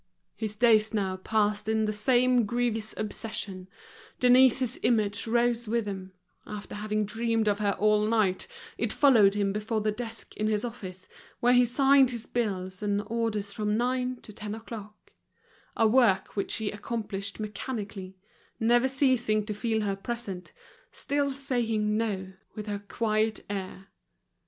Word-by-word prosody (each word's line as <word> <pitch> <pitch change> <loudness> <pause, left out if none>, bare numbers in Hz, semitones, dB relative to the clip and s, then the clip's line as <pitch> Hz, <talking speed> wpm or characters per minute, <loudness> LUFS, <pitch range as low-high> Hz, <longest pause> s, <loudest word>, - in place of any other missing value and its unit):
His 215 -2 -4
days 220 -1 +4
now 190 -3 0
passed 210 +1 0
in 220 0 +2
the 215 - -1
same 245 +2 +3
grievous 230 -2 -1
obsession, 205 -3 -5 0.5
Denise's 255 0 +4
image 215 -2 +1
rose 235 0 +1
with 230 0 0
him; 190 -2 -6 0.3
after 210 -1 -8
having 210 0 -1
dreamed 225 +1 0
of 205 0 +2
her 205 -1 +1
all 210 0 +3
night, 215 -5 +1 0.3
it - - 0
followed 220 -9 +5
him 200 -1 +1
before 215 +2 -1
the 215 0 +1
desk 225 +1 -7
in 215 - -1
his 215 +2 0
office, 190 -6 -8 0.3
where 245 +1 +4
he 245 0 +6
signed 270 +2 +5
his 235 -2 -5
bills 190 -5 -2
and 205 0 0
orders 215 -2 -2
from 210 0 0
nine 250 +1 0
to 210 - -11
ten 210 0 -6
o'clock: 215 -2 -10 0.7
a 225 - +5
work 215 -5 +3
which 200 - -1
he 220 -2 -2
accomplished 205 -2 -5
mechanically, 205 -3 -5 0.4
never 240 +3 +4
ceasing 255 -6 +2
to 210 - -3
feel 220 +1 -1
her 200 -2 -1
present, 195 -3 -6 0.4
still 285 0 -1
saying 230 -6 -1
no, 195 -4 -2 0.2
with 215 -2 -5
her 205 -1 -3
quiet 215 +1 -1
air. 195 -1 -6
215 Hz, 150 wpm, -28 LUFS, 205-235 Hz, 0.7 s, he